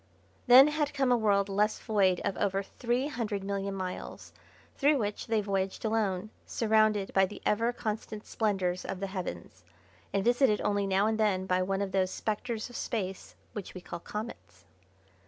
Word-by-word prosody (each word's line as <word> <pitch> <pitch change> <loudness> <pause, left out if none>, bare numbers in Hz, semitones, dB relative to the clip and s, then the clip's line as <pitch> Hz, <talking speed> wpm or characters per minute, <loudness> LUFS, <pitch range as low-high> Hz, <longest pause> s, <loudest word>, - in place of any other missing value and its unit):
Then 260 +4 +9
had 300 -1 -1
come 270 -2 +2
a - - +6
world 205 -3 +2
less 210 +2 +1
void 195 -4 +2
of 200 -2 -1
over 195 -1 0
three 240 +5 -1
hundred 220 -8 -3
million 195 0 -2
miles, 185 -1 -6 0.4
through 290 +1 +3
which 210 -4 -3
they 225 -2 +2
voyaged 195 0 -2
alone, 215 -2 0
surrounded 215 -3 +2
by 190 0 +4
the 210 - -9
ever 230 +3 +2
constant 215 -2 -5
splendours 190 -5 -1
of 195 - -5
the 195 - -2
heavens, 95 - -6 0.5
and 195 - 0
visited 240 -2 +4
only 205 -1 0
now 195 +1 +2
and 220 0 0
then 195 -4 +2
by 185 -1 +1
one 195 +2 0
of 195 - -4
those 190 -1 +1
Spectres 220 +2 -3
of 245 - -13
Space, 190 -5 -4 0.2
which 205 -3 -7
we 185 - -7
call 170 - -7
comets. 210 - -8
205 Hz, 175 wpm, -30 LUFS, 190-225 Hz, 0.5 s, Then